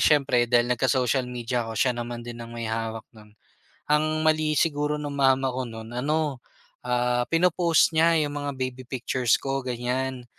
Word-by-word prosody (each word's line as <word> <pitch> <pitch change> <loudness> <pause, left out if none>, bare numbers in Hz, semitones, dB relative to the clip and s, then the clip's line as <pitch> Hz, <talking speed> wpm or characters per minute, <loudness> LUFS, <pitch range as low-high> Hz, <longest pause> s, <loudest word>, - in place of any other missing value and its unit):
siyempre 130 -5 +3
dahil 120 0 +3
nagka-social 125 0 +1
media 120 -1 -3
ako 110 - -6
siya 125 +3 +2
naman 120 0 -6
din 120 0 -8
ang 115 0 -8
may 115 - -4
hawak 115 0 -3
no'n, 105 -1 -18 0.6
ang 155 +1 +1
mali 155 -1 +2
siguro 150 0 +1
ng 145 -1 -5
mama 135 -1 +2
ko 125 -1 -3
no'n 110 0 -9
ano, 145 +1 -1 0.5
ah, 125 0 +1
pinopost 170 -1 +3
niya 165 +1 +4
yung 145 0 -4
mga 145 -1 -4
baby 130 -1 -5
pictures 125 -2 +1
ko 135 0 -2
ganyan, 125 +1 -3
130 Hz, 170 wpm, -25 LUFS, 120-145 Hz, 0.6 s, niya